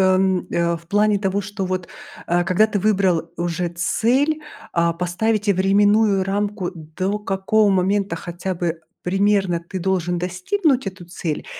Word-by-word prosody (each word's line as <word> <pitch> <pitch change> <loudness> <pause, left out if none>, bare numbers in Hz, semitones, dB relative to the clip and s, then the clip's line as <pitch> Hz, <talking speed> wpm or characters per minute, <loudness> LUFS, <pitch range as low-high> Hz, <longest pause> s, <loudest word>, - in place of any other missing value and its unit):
м, 190 -1 +1
э, 170 0 +1
в 165 0 -19
плане 205 +1 +3
того, 195 0 0
что 205 -1 -4
вот, 185 -1 -3 0.4
а 175 +1 +2
когда 190 +5 +3
ты 205 -2 -1
выбрал 190 -5 +1
уже 175 0 -1
цель, 250 - +1 0.3
а, 170 0 +2
поставить 205 +5 -1
временную 200 +1 +3
рамку, 200 -1 -2
до 185 +6 -3
какого 205 +1 +2
момента 195 0 +1
хотя 175 +2 -4
бы 170 -1 -2 0.2
примерно 195 -2 +1
ты 190 - -4
должен 175 -1 0
достигнуть 250 - 0
эту 185 -2 -6
цель? 170 -3 -4
190 Hz, 145 wpm, -21 LUFS, 175-205 Hz, 0.4 s, плане